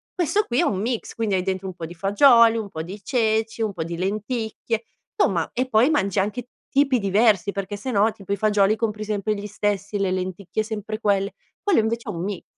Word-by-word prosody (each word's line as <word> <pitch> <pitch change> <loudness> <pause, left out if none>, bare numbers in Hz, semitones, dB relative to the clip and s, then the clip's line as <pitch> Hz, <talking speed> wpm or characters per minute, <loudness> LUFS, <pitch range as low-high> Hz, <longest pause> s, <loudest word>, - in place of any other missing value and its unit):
questo 400 +4 +1
qui 240 - 0
è - - +4
un 190 - 0
mix, 235 +1 -3
quindi 220 -4 0
hai 185 - 0
dentro 190 0 -2
un 185 - -5
po' 165 -2 -6
di 170 - -9
fagioli, 230 - +5
un 215 -3 -4
po' 160 -3 -5
di 195 +4 -8
ceci, 225 -1 0
un 210 -2 -1
po' 165 -3 -3
di 170 +1 -5
lenticchie, 220 +3 -2 0.3
somma 170 -4 +1
e 255 +1 -1
poi 230 +4 +4
mangi 200 - +1
anche 215 +5 -2 0.3
tipi 275 -3 +4
diversi 200 -1 +3
perché 200 +1 -4
se 255 +6 -4
no 215 0 +3
tipo 200 -2 -5
i - - +2
fagioli 210 0 +3
compri 215 -1 -2
sempre 210 0 -1
gli 205 +1 -6
stessi, 205 0 -2
le 190 -2 +1
lenticchie 185 +2 -2
sempre 215 0 -5
quelle, 200 -2 +1 0.3
quello 405 - +3
invece 230 +2 -2
è - - -1
un 170 +1 -4
mix." 200 -1 -4
210 Hz, 220 wpm, -23 LUFS, 195-225 Hz, 0.3 s, fagioli